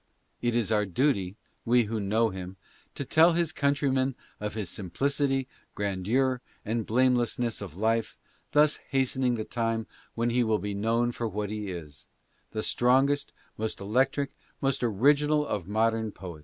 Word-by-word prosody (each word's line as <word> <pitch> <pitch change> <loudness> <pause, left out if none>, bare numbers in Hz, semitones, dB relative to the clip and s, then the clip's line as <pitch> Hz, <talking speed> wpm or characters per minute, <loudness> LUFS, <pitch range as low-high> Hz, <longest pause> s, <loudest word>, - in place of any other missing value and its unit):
It 120 -1 0
is 115 -2 +1
our 105 -2 +2
duty, 100 - +1 0.3
we 120 +1 +4
who 110 +1 -3
know 110 +3 +2
him, 95 0 -7 0.4
to 140 - -4
tell 165 +5 +5
his 170 -2 +1
countrymen 140 -3 +1 0.2
of 105 0 -4
his 105 -4 -3
piicit 135 - 0 0.3
grandeur 110 +7 0 0.2
and 115 +1 -2
blamelessness: 120 -1 +1
f 95 -6 -7
life, 110 +2 0 0.3
thus 150 0 +4
hastening 130 -2 +1
the 110 - -3
time 115 -1 -1 0.3
when 120 +1 0
he 125 +1 +3
will 110 -2 +2
be 105 0 -4
known 115 +4 +1
for 120 -1 -3
what 105 -1 -3
he 105 -2 -4
is 75 -6 -8 0.2
— - - -41
the 110 -1 -3
strongest, 135 +4 +2 0.3
most 110 0 -2
electric, 130 +7 +1 0.3
most 135 -1 0
original 145 +7 +3
of 100 - -3
modern 110 +1 +1
poe 90 -6 -9
115 Hz, 155 wpm, -28 LUFS, 105-135 Hz, 0.4 s, tell